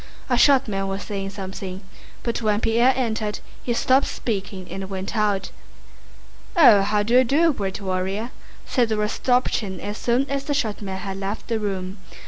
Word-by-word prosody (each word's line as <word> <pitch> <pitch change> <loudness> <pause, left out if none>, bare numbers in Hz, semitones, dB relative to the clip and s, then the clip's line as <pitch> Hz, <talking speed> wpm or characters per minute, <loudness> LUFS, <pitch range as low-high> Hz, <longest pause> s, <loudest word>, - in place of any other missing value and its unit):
A - - +5
short 270 +1 +5
man 195 -2 -2
was 195 +1 -3
saying 195 -2 -4
something, 190 -1 -6 0.4
but 235 0 -2
when 210 -2 +2
Pierre 230 +3 +4
entered 220 -4 -1 0.3
he 245 - -2
stopped 260 +3 +3
speaking 195 -4 -4
and 190 0 -5
went 190 +2 -4
out. 205 -3 0 1.1
"Ah, 230 -11 +8
how 205 +1 +1
do 230 +3 -1
you - - +5
do, 305 +6 +3
great 195 -6 -3
warrior?" 195 +4 -2 0.3
said 245 -4 +1
Rostopchín 215 -2 0
as 205 +1 -5
soon 250 +3 +1
as 275 0 -2
the 290 - -1
short 220 -8 -1
man 190 -2 -4
had 195 0 -5
left 195 +4 -5
the 225 -1 0
room. 190 -2 -4
210 Hz, 170 wpm, -23 LUFS, 195-240 Hz, 1.1 s, Ah